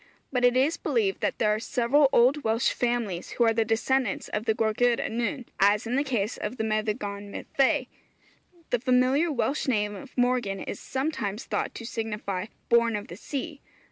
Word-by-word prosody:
But 250 -1 +1
it 245 0 +5
is 280 +6 +2
believed 405 -4 0
that - - 0
there 210 -2 +2
are 215 - -1
several 255 +5 +3
old 265 +5 +4
Welsh 225 +2 +2
families 235 -7 -2
who 240 - +4
are 225 -1 +4
the 225 0 +2
descendants 225 +1 0
of 210 +1 -3
the 220 - +2
Gwragedd 230 +2 +2
Annwn, 240 +3 -2
as 205 +2 +4
in 235 +2 -1
the 280 - +2
case 235 -6 -1
of 215 +5 -4
the 220 - -1
Meddygon 210 -2 -2
Myddfai. 275 +5 +1 0.9
The 245 - +2
familiar 255 +6 +3
Welsh 285 +1 -1
name 210 -4 +1
of 200 - -11
Morgan 245 -6 +1
is - - -5
sometimes 260 -6 -3
thought - - -2
to 230 - -7
signify, 210 -4 -3 0.2
'Born 235 -1 +3
of 210 +3 -5
the - - -7
Sea.' 285 +1 -5
235 Hz, 180 wpm, -27 LUFS, 215-260 Hz, 0.9 s, it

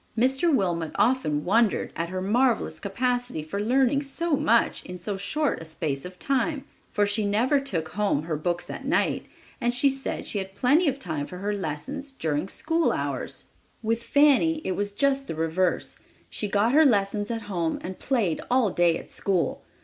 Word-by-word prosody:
Mr. 265 +8 +3
Wilmot 175 - 0
often 215 - +1
wondered 220 +2 +2
at 165 +1 -2
her 185 0 -3
marvelous 235 +4 +1
capacity 245 -2 -1
for 200 +6 -4
learning 265 +4 +3
so 300 +3 -1
much 235 -3 +2
in 180 0 -7
so 195 +3 -4
short 290 - -1
a - - -7
space 155 -3 -3
of 180 0 -9
time, 275 - 0 0.3
for 205 - +2
she 205 +2 +1
never 230 +8 +2
took 170 -13 -3
home 195 -5 0
her 160 -1 -2
books 175 +3 -2
at - - -6
night, - - 0 0.3
and 240 0 +1
she 275 +2 +4
said 270 0 -4
she 205 - -2
had 190 0 -6
plenty 295 - +3
of 275 -1 +1
time 155 - -3
for 180 - -8
her 205 +3 -2
lessons 205 - -4
during 160 - -1
school 325 +10 0
hours. - - -3 0.4
With 225 +1 0
Fanny 290 +4 +4
it - - 0
was 205 +2 -1
just 275 +4 +1
the - - -4
reverse. 165 +3 -1 0.3
She 210 - -2
got 205 +4 +2
her 315 +2 +7
lessons 205 -5 +2
at 230 -2 -3
home 175 -5 -1
and 185 +1 -6
played 225 - 0
all 245 -5 +3
day 175 -1 +3
at - - -11
school! 190 -4 0
210 Hz, 185 wpm, -26 LUFS, 180-265 Hz, 0.4 s, her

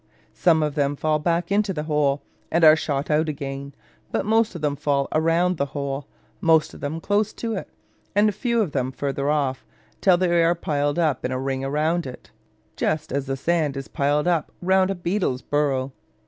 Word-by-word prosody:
Some 160 -4 +3
of 150 -1 -1
them 145 -1 0
fall 155 +1 0
back 170 +3 0
into 205 -1 +2
the 150 -3 -3
hole, 150 -2 +1 0.3
and 170 +1 +1
are 155 -1 +9
shot 145 -2 -2
out 155 +1 +2
again: 140 -1 -6 0.4
but - - -1
most 220 -1 +2
of 170 - -6
them 145 -2 0
fall 140 -1 0
round 165 +3 +2
the 140 - 0
hole, 140 0 -3 0.3
most 160 -2 +3
of - - -11
them 150 +3 -3
close 205 +4 0
to 230 -1 -4
it, 195 - -5 0.5
and 210 +1 +4
fewer 235 +2 +1
of 175 - -4
them 130 -2 -1
farther 140 +1 -2
off, 140 -4 0 0.4
till 185 -3 +5
they 175 -2 +3
are 170 +1 +3
piled 145 -2 -1
up 155 -7 +1
in 125 - -1
a 130 - -1
ring 135 0 -2
round 155 +4 0
it, 125 - -11 0.4
just 155 +1 -1
as 140 0 -1
the 135 0 -2
sand 155 -2 0
is 135 - -5
piled 145 +3 0
up 170 -3 +1
round 190 +1 +3
a 195 - -1
beetle's 175 -7 -1
burrow. 140 -2 0
155 Hz, 200 wpm, -23 LUFS, 140-175 Hz, 0.5 s, are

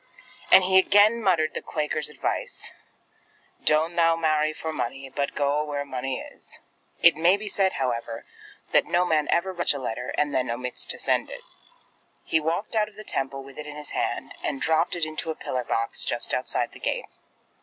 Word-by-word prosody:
And 190 - +9
he 190 +1 +5
again 205 +4 +5
muttered 165 -7 +2
the - - -4
Quaker's 150 -1 -2
advice, 150 - -3 0.9
"Doan't 160 +3 +2
thou 165 -1 +5
marry 155 -2 +2
for 160 +1 -5
munny, 135 0 -4
but 140 +1 -2
goa 145 +1 +1
where 145 -1 -3
munny 130 -1 -3
is!" - - -11 0.5
It 170 -2 +8
may 170 +5 +4
be 210 +1 -7
said, 195 -2 +1
however, 120 -3 -3 0.5
that - - +4
no 175 +1 +2
man 155 -3 +1
ever 190 +2 +1
writes 175 -1 -1
such 145 - +3
a 135 - -7
letter, 125 +1 -3
and 145 -1 +1
then 130 - 0
omits 125 +2 -2
to - - -4
send - - +1
it. - - -8 0.8
He 160 - +2
walked 170 +9 -2
out 210 -1 +2
of 215 - -23
the 215 - -9
Temple 135 -6 -2
with 135 +1 -12
it 150 - -6
in 150 - -8
his 150 0 -7
hand, - - -2
and 135 - -2
dropped 160 +2 +1
it 170 -2 0
into 155 +1 -4
a 160 - -2
pillar 130 - -4
letter 125 - -3
box 115 0 0
just - - 0
outside - - 0
the - - -13
gate. - - -2
155 Hz, 200 wpm, -26 LUFS, 135-175 Hz, 0.9 s, And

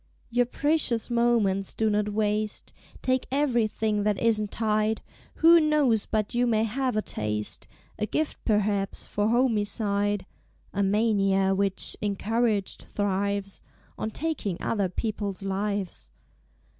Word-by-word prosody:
Your 245 0 +2
precious 280 -5 0
moments 230 -5 +2
do 220 - +1
not 210 0 +1
waste; 210 0 -1 0.3
Take 255 0 +1
Ev'rything 225 -6 +1
that 205 -1 +1
isn't 215 -3 +2
tied! 215 0 0 0.3
Who 335 +1 +7
knows 295 -8 +2
but 215 +2 -1
you 245 +1 +2
may 220 -2 +2
have 250 +1 -1
a 215 - +1
Taste, 105 0 -3 0.3
A 215 - -1
Gift 310 +5 -2
perhaps, 210 -2 0
for 205 0 -1
Homicide, 205 -4 +1 0.5
(A 200 - 0
Mania 195 -2 +2
which, 195 0 0
encouraged, 210 0 0
thrives 200 0 -2 0.3
On 215 - -3
Taking 245 - -3
Other 200 -4 0
People's 205 0 -3
Lives). 195 -1 -3
215 Hz, 120 wpm, -27 LUFS, 200-235 Hz, 0.5 s, Who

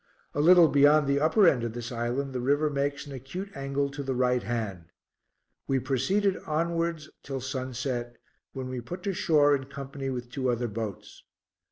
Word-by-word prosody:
A 145 - 0
little 175 +1 +7
beyond 145 +1 +5
the 140 0 +2
upper 175 +6 +4
end 125 -7 +3
of 115 -1 -3
this 120 0 -6
island 125 +3 -2
the 125 - -2
river 145 +4 +2
makes 140 +1 -1
an 145 - -10
acute 175 +10 -7
angle 140 +1 -1
to 145 0 -5
the 135 -2 -2
right 125 0 +2
hand. 110 -8 -3 0.8
We 135 - +2
proceeded 140 - +1
onwards 165 0 -1
till 135 -1 -5
sunset, 130 -2 -4 0.4
when 130 -1 -5
we 130 -1 -4
put 175 +9 -8
to 200 - -1
shore 150 -5 +4
in 135 -1 -4
company 140 0 -6
with 120 -2 -5
two 130 -1 -1
other 120 0 0
boats. 105 -3 -6
135 Hz, 180 wpm, -28 LUFS, 125-150 Hz, 0.8 s, little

